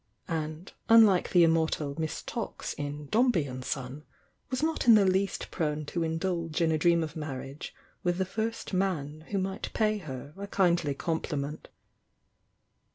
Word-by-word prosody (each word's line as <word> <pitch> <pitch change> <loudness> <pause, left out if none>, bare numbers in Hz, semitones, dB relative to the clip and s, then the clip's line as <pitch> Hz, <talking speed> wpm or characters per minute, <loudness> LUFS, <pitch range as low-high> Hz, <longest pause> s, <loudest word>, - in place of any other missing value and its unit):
— - - -43
and 160 +1 -4 0.2
unlike 220 -5 +6
the 175 -2 +6
immortal 160 -3 +2
Miss 160 -1 -3
Tox - - -4
in 145 +1 -5
"Dombey 230 - +3
and 130 -1 -6
Son," 135 +3 -4 0.5
was 255 +3 -2
not 320 -5 0
in 230 - +10
the 205 -2 +5
least 190 +1 0
prone 150 -3 -1
to 170 +4 -3
indulge 165 0 -1
in 165 -1 +3
a 160 - +2
dream 170 +1 +4
of 155 - -6
marriage 140 -2 -6 0.3
with 175 -2 0
the 190 - +1
first 220 +3 -3
man 160 -5 -1
who 205 - -1
might 190 +2 -3
pay 215 -1 +1
her 140 -4 -8
a 200 0 -6
kindly 175 -7 +2
compliment. 150 -2 -3
165 Hz, 160 wpm, -29 LUFS, 150-195 Hz, 0.5 s, in